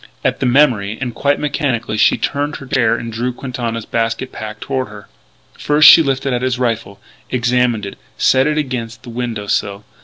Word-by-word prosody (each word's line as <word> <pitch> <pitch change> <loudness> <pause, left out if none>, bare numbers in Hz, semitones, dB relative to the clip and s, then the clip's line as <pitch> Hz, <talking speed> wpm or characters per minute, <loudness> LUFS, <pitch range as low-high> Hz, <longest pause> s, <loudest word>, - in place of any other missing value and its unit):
At - - 0
the - - 0
memory, 120 -6 +2
and 125 -3 -3
quite 140 +3 0
mechanically, 140 -7 -1
she - - +3
turned 145 +1 -2
in - - -7
her - - -8
chair 125 -3 +2
and 115 -1 -6
drew 120 +3 -2
Quintana's 120 -3 -5
basket 115 +3 -2
pack 110 0 -7
toward 130 0 -3
her. 105 -1 -12 0.5
First 150 +1 +5
she 165 - +9
lifted 135 -2 -1
out 120 - -1
his 130 -1 0
rifle, 115 -5 -2 0.3
examined 125 -3 +1
it, 100 - -9 0.2
set 130 +2 +3
it 150 0 0
against 125 -5 -4
the 125 - -10
window 115 -3 -4
sill. 100 0 -2
125 Hz, 190 wpm, -17 LUFS, 115-135 Hz, 0.5 s, she